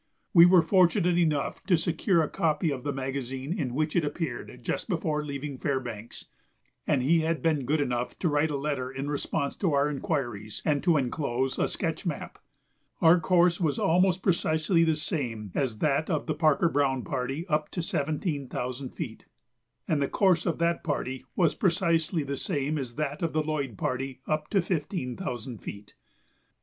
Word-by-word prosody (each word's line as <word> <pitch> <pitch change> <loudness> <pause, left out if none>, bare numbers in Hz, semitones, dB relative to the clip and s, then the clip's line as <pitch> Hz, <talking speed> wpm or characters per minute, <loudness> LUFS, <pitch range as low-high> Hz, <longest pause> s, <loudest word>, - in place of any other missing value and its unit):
We 170 0 +9
were 180 -2 +6
fortunate 180 -2 +3
enough 155 -5 0
to 180 -4 +5
secure 170 +2 +2
a - - -1
copy 155 +1 0
of 135 -2 -3
the 145 - -2
magazine 135 +1 -3
in 130 - -2
which 155 +1 0
it 175 - +3
appeared 155 +3 -4
just - - -3
before 155 -4 0
leaving 140 -2 -5
Fairbanks, 120 -6 -4 0.6
and 140 -4 +2
he 165 +5 +4
had 160 0 -1
been 155 -5 +1
good 150 +4 +1
enough 125 -3 -1
to 175 - 0
write 150 0 +2
a 145 - -1
letter 140 -3 -2
in 135 +2 -4
response 140 -1 -2
to 180 -7 +1
our 140 +1 +3
inquiries 120 -8 -3
and 145 -3 +2
to 170 -3 +3
enclose 130 -1 -1
a - - +2
sketch - - -3
map. - - -5 0.6
Our 165 +2 +6
course 175 0 +3
was 150 -5 +1
almost 180 +2 +2
precisely 165 -1 +2
the 160 -1 +2
same 125 - -3
as 125 -6 -1
that 150 +4 +1
of 155 -5 0
the 155 - -1
Parker 155 +1 +3
Browne 135 -4 +1
party 135 +6 -3
up 150 -2 0
to 175 - -3
seventeen 145 -2 -2
thousand 125 +1 -4
feet, - - -6 0.6
and 150 -2 +1
the 140 - +2
course 185 -1 +2
of 170 - 0
that 170 0 0
party 130 -4 -3
was 170 -4 +3
precisely 170 -3 +1
the 140 0 -4
same 150 -2 -1
as 125 -3 -6
that 150 0 -3
of 165 -2 -1
the 155 0 +1
Lloyd 140 -8 -3
party 130 +3 -3
up 155 0 -1
to 195 -4 +2
fifteen 155 -7 -2
thousand 120 - -5
feet. 100 0 -9
150 Hz, 180 wpm, -28 LUFS, 135-165 Hz, 0.6 s, We